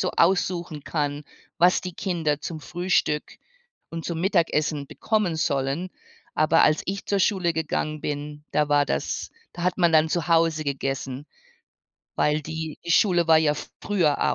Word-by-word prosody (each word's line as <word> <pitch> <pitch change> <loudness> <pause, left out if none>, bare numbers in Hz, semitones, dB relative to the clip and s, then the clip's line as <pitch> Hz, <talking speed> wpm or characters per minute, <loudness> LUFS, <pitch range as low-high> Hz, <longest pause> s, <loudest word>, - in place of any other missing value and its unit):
so - - 0
aussuchen 175 -3 +1
kann, 145 -2 -2 0.4
was 180 +1 +5
die 180 - -6
Kinder 160 -7 -1
zum 165 - -5
Frühstück 175 -2 -1 0.5
und 165 0 -6
zum 165 -1 -3
Mittagessen 155 -6 +1
bekommen 210 -7 0
sollen. 145 +3 -1 0.4
Aber 155 +1 +4
als 155 - +3
ich 195 +1 -4
zur 200 -1 +1
Schule 185 -4 +2
gegangen 155 -1 -2
bin, 150 0 -5
da 150 -1 +1
war 145 0 +4
das - - -3 0.2
da 175 - -7
hat 180 0 0
man 170 -2 +4
dann 160 0 +5
zu 170 -1 -1
Hause 165 -2 +3
gegessen, 135 -1 -3 0.9
weil 150 +1 +1
die 160 0 -5
die 170 - -4
Schule 175 -1 +4
war 160 -1 +7
ja 155 -2 +2 0.3
früher 170 -8 +1
160 Hz, 155 wpm, -25 LUFS, 150-175 Hz, 0.9 s, war